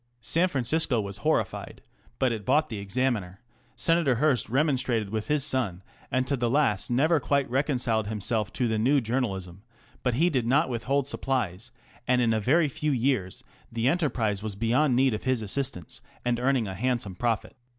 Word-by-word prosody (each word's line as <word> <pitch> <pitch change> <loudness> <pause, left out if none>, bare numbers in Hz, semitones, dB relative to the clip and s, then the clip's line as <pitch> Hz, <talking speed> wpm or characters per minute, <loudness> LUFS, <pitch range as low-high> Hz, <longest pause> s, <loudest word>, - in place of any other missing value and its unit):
San 165 +9 +2
Francisco 140 -3 +1
was 100 -2 -4
horrified, - - -2 0.3
but 130 -2 +2
it 110 -3 -4
bought 145 +8 +2
the 110 -4 -5
Examiner; 100 -3 -2 0.4
Senator 165 -6 +2
Hearst 130 -3 +1
remonstrated 125 -6 0
with 110 -1 -3
his 150 -2 +1
son, 100 -9 -2 0.3
and 130 0 0
to 140 +2 0
the 120 -2 0
last 125 -7 +1
never 150 +7 +3
quite 140 0 +1
reconciled 125 -6 0
himself 105 0 -1
to 125 - 0
the 110 -1 0
"new 135 +6 +3
journalism," 100 -7 -3 0.4
but 125 -2 0
he 170 +7 +3
did 125 -5 0
not 145 +6 +3
withhold 130 +3 0
supplies, 120 -6 -2 0.4
and 125 0 +3
in 115 -2 +2
a 110 - +1
very 150 +9 +3
few 150 +2 -2
years 120 -7 0 0.3
the 115 +1 0
enterprise 125 - 0
was 105 -2 -4
beyond 120 +6 +2
need 130 -1 +3
of 105 - -3
his 130 -3 +1
assistance 105 - -3 0.2
and 120 -1 +1
earning 125 -3 +1
a 95 - -4
handsome 120 -1 -1
profit. 115 +4 -2
125 Hz, 175 wpm, -27 LUFS, 110-135 Hz, 0.4 s, never